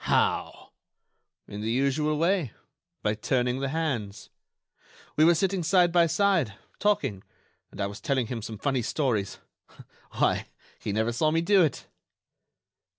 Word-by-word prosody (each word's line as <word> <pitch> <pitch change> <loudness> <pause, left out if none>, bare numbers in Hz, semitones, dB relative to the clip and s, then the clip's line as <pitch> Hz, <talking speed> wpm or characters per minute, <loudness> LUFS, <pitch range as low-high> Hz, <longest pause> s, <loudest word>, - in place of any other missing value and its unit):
"How?" - - 0 0.8
"In 105 - -7
the 110 - -2
usual 140 +5 +1
way, 170 - +1 0.5
by 105 - +1
turning 125 +3 0
the 135 0 -2
hands. 130 -10 -3 0.8
We 155 - +4
were 170 +1 +6
sitting 190 +2 0
side 175 +1 +3
by 170 -1 +4
side, 165 - +1 0.2
talking, 135 - 0 0.5
and - - -14
I 100 - +1
was 100 +1 -7
telling 130 -3 0
him 115 0 -5
some 110 0 -7
funny 135 +2 0
stories.... 115 -6 -1 0.8
Why! - - +1 0.3
he 105 - -4
never 110 +3 0
saw 155 +7 +1
me 165 +1 +1
do 195 +3 +4
it." 155 -4 0
135 Hz, 145 wpm, -27 LUFS, 110-165 Hz, 0.8 s, were